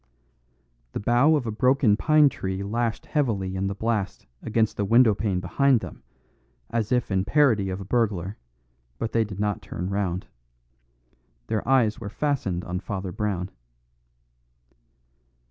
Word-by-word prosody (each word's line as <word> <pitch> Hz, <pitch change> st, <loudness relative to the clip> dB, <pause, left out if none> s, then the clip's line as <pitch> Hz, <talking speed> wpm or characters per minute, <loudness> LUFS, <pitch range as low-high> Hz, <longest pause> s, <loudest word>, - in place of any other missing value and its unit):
The -, -, -2 dB
bough 120 Hz, +9 st, +4 dB
of 140 Hz, -5 st, -1 dB
a 110 Hz, -, -2 dB
broken 125 Hz, -1 st, +3 dB
pine 155 Hz, +4 st, +5 dB
tree 95 Hz, -7 st, -3 dB
lashed 115 Hz, +3 st, -2 dB
heavily 105 Hz, -11 st, -1 dB
in 95 Hz, +1 st, -1 dB
the 100 Hz, -, -3 dB
blast 100 Hz, -, -2 dB, 0.2 s
against 110 Hz, -1 st, 0 dB
the 105 Hz, -, -1 dB
windowpane 105 Hz, -3 st, +3 dB
behind 125 Hz, +7 st, +2 dB
them, -, -, -9 dB, 0.7 s
as 115 Hz, 0 st, -1 dB
if 125 Hz, -4 st, +1 dB
in 95 Hz, -1 st, +2 dB
parody 110 Hz, -4 st, +3 dB
of 95 Hz, +1 st, -4 dB
a 100 Hz, -, -7 dB
burglar, 100 Hz, -3 st, 0 dB, 0.6 s
but 115 Hz, -, -3 dB
they 115 Hz, -, +2 dB
did 100 Hz, -3 st, -8 dB
not 105 Hz, -1 st, -1 dB
turn 90 Hz, +3 st, -5 dB
round. 95 Hz, -2 st, -1 dB, 1.2 s
Their 110 Hz, -, -2 dB
eyes 120 Hz, -5 st, +3 dB
were 105 Hz, -, -6 dB
fastened 105 Hz, -9 st, -1 dB
on 90 Hz, 0 st, -3 dB
Father 95 Hz, -1 st, -5 dB
Brown. 95 Hz, -1 st, -2 dB
105 Hz, 145 wpm, -25 LUFS, 95-120 Hz, 1.2 s, pine